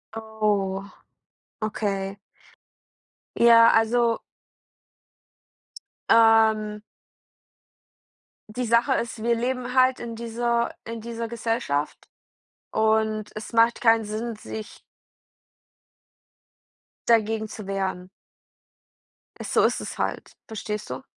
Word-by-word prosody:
Oh, 210 -3 -1 0.7
okay. 200 -2 -2 1.2
Ja, 230 -1 +7
also 230 +1 +2 1.9
ähm 220 -2 +4 1.7
die 245 +4 -4
Sache 235 +4 +3
ist, 230 -1 -4
wir 235 0 +2
leben 250 +1 -3
halt 255 0 +3
in 235 -1 -6
dieser 235 +1 -1
in 230 0 -6
dieser 230 0 -5
Gesellschaft, 225 -11 -2 0.6
und 220 -1 +1
es 215 +2 -8
macht 230 +1 +4
keinen 225 -1 +4
Sinn, 220 +2 -4
sich 215 0 -9 2.3
dagegen 220 -1 +2
zu 210 -3 -9
wehren. 190 -2 -3 1.3
Es - - -6
so - - +4
ist - - +1
es - - -7
halt. - - -4
Verstehst 210 -1 -5
du? - - -6
225 Hz, 90 wpm, -24 LUFS, 215-235 Hz, 2.3 s, Ja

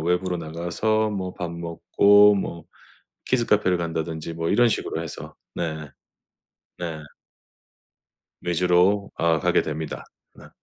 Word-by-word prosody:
외부로 90 +2 0
나가서 85 +7 -1
뭐 95 -3 -4
밥 90 -1 -4
먹고 100 +5 +4
뭐 85 -4 -4 0.6
키즈카페를 105 -7 +2
간다든지 80 -1 -4
뭐 80 0 -3
이런 120 -1 +4
식으로 80 -6 -2
해서 80 - -8 0.2
네. 80 -3 -4 0.9
네. 80 -3 -5 1.4
위주로 90 +3 +2
아 85 -1 +2
가게 - - +2
됩니다. 80 0 -5 0.3
어. - - -13
85 Hz, 225 characters per minute, -24 LUFS, 80-100 Hz, 1.4 s, 먹고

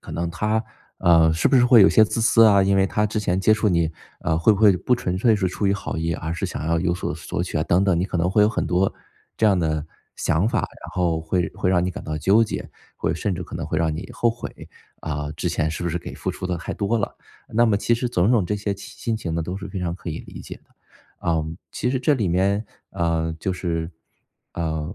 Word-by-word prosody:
可 - - -11
能 85 0 -2
他， 110 +5 -1 0.3
呃， 80 -2 +5
是 80 - +1
不 140 - +2
是 125 - +5
会 120 -3 +7
有 95 - +7
些 110 - +6
自 115 - -2
私 115 0 +5
啊， 100 -3 +6
因 100 0 +2
为 95 0 +4
他 105 +2 0
之 110 +1 -2
前 90 -3 0
接 100 +3 +4
触 105 0 +1
你， 85 -3 +1 0.3
呃， 80 -1 0
会 95 +6 +5
不 100 - -1
会 100 -4 +6
不 125 - +1
纯 90 -6 -2
粹 110 +1 +4
是 95 - 0
出 100 +3 -2
于 100 - +3
好 100 - -4
意， 85 +1 -1
而 80 +1 -4
是 - - -2
想 75 - -5
要 80 0 +1
有 85 -1 +1
所 90 - -3
索 85 - -4
取 85 - -3
啊， 75 - +1
等 90 +4 +2
等， 90 -4 +2
你 90 - +1
可 90 - -3
能 90 +2 +1
会 105 +1 +4
有 105 - +5
很 - - -2
多 90 +2 +1 0.4
这 110 - +3
样 100 -3 +4
的 80 -2 -1 0.3
想 85 +7 +1
法。 125 - 0
然 - - -8
后 85 -3 +1
会 90 -1 0
会 90 - -1
让 90 -2 +3
你 90 - -1
感 - - -8
到 75 -1 -3
纠 100 +9 +4
结， - - -5 0.3
会 80 - -1
甚 90 +5 -2
至 90 - -5
可 - - -8
能 85 - -4
会 80 - -1
让 80 -2 0
你 85 - -6
后 120 - +1
悔， 120 - -9 0.3
啊， 75 -1 -4
之 90 - -1
前 80 -2 0
是 80 - -5
不 - - 0
是 85 - -2
给 - - -8
付 - - -3
出 95 - -5
的 90 -1 -2
太 80 - -5
多 110 +3 0
了。 100 - -3 0.3
那 115 +2 +3
么 105 - +3
其 115 - +2
实 120 +1 -2
种 90 +1 +2
种 110 -6 +3
这 105 - -1
些 100 -1 -2
期 100 - -11
心 115 -1 -1
情 85 -7 -4
呢， 85 - -1
都 90 +4 -4
是 100 0 -6
非 95 0 -5
常 85 -1 -2
可 85 -2 -7
以 80 - -4
理 - - -11
解 - - -9
的。 - - -39 0.5
啊， 80 -2 0 0.3
其 - - -2
实 130 - 0
这 145 +4 +3
里 110 -8 -1
面， 100 +5 +1 0.2
啊， 80 -1 -1
就 95 - -1
是 85 -2 -3 0.6
呃， 80 -1 -3
90 Hz, 290 characters per minute, -23 LUFS, 85-105 Hz, 0.6 s, 会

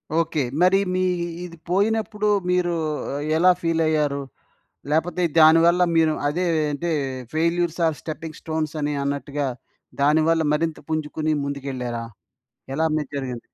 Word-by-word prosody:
Okay. 165 -2 +1 0.2
మరి 185 +2 +5 0.2
మీ 185 - +1 0.4
ఇది 170 -1 -11
పోయినప్పుడు 210 +2 +1 0.2
మీరు 180 -1 +1 0.6
ఎలా 180 +3 +6
ఫీలయ్యారు? 155 -4 +1 0.7
లేపోతే 160 +3 0 0.2
దానివల్ల 165 +3 +6 0.2
మీరు 160 -1 +4
అదే 175 +5 0 0.3
అంటే 170 +4 -3 0.4
'ఫెయిల్యూర్స్ 170 +1 0
ఆర్ 160 -2 0
స్టెప్పింగ్ 155 0 -7
స్టోన్స్' 160 -1 -3
అని 145 0 -1
అన్నట్టుగా 140 0 -2 0.5
దాని 150 +3 +4
వల్ల 165 0 +3
మరింత 160 +1 0
పుంజుకొని 155 0 -1
ముందుకెళ్లారా? 130 -4 -4 0.7
ఎలా 160 +4 +1
మీది 150 -3 -3
జరిగింది? 125 -3 -4
160 Hz, 120 wpm, -23 LUFS, 145-170 Hz, 0.7 s, ఎలా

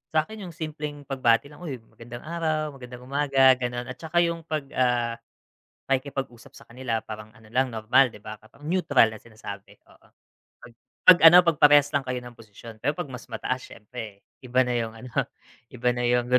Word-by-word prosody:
sa'kin 195 +5 -1
yung 170 - -11
simpleng 150 -3 -6
pagbati 130 -1 +1
lang 145 - -15
uy 160 -7 -5
magandang 120 +1 -11
araw, 155 -2 -2
magandang 125 0 -10
umaga 135 -1 +4
,gano'n 120 0 -4
at 125 - -11
tsaka 175 +2 +1
yung 170 0 -1
pag 155 -3 -2
ah, 120 -2 0 0.7
pakikipag 135 -1 -1
usap 120 -1 -17
sa - - -14
kanila 120 -2 -3
parang 110 0 -9
ano 110 -1 -19
lang 130 0 0
normal 115 +5 +4
'di 105 - -14
ba? 110 0 -8
Parang 110 +7 -21
neutral 145 -11 +3
na 110 - -9
sinasabi 100 -3 -10
oo. - - -24 0.5
Pag 120 - -15 0.3
pag 185 -1 +10
ano 165 +2 +10
pag 165 -3 +2
parehas 145 -1 +6
lang 145 - +2
kayo 130 -1 -4
ng 120 -1 -9
posisyon 110 0 -14
pero 145 - -1
pag - - -3
mas 125 - -10
mataas 125 +3 -3
syempre 105 -2 -10 0.2
iba 125 0 0
na 125 - -1
yung 115 -2 -2
ano 125 +2 -11 0.6
iba 125 0 -1
na 120 - -3
yung 120 0 +2
125 Hz, 190 wpm, -25 LUFS, 115-145 Hz, 0.7 s, pag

